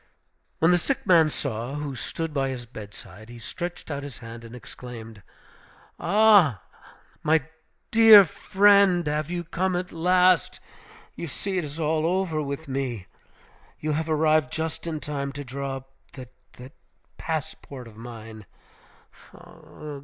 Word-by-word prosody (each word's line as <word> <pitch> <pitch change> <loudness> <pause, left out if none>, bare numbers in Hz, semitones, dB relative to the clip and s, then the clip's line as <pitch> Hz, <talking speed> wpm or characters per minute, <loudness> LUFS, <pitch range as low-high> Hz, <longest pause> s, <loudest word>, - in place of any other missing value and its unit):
When 165 +2 +4
the 175 - +4
sick 275 +8 -2
man 165 -4 +5
saw 130 -2 -4
who 145 -2 -4
stood 160 +5 -5
by 135 -2 0
his 125 -2 -5
bedside, 110 -2 -11
he 120 - -10
stretched 175 +7 -6
out 140 -1 -3
his 140 -2 -8
hand 115 0 -10
and 115 +1 -10
exclaimed, 115 -3 -10 0.8
"Ah! 200 - +5 0.6
my 155 -1 +3 0.5
dear 225 -3 +9
friend! 195 -1 +4
have 150 +1 -1
you 175 -1 -3
come 180 +3 -1
at 180 0 -3
last? 180 0 +3 0.5
You 170 - -6
see 190 +6 -2
it - - -3
is 145 +2 -7
all 160 0 +1
over 180 -3 0
with 140 +2 -5
me. 130 -7 -3 0.7
You 155 - -2
have 160 +2 -2
arrived 155 0 +2
just 160 +1 -4
in 160 -2 -3
time 140 -2 -4
to 145 +1 -6
draw 135 +1 -4
up 135 0 -14 0.2
that 130 -2 -10 0.2
that 130 +3 -12 0.5
passport 150 -5 -5
of 110 - -14
mine. 110 -3 -10
150 Hz, 145 wpm, -25 LUFS, 125-170 Hz, 0.8 s, dear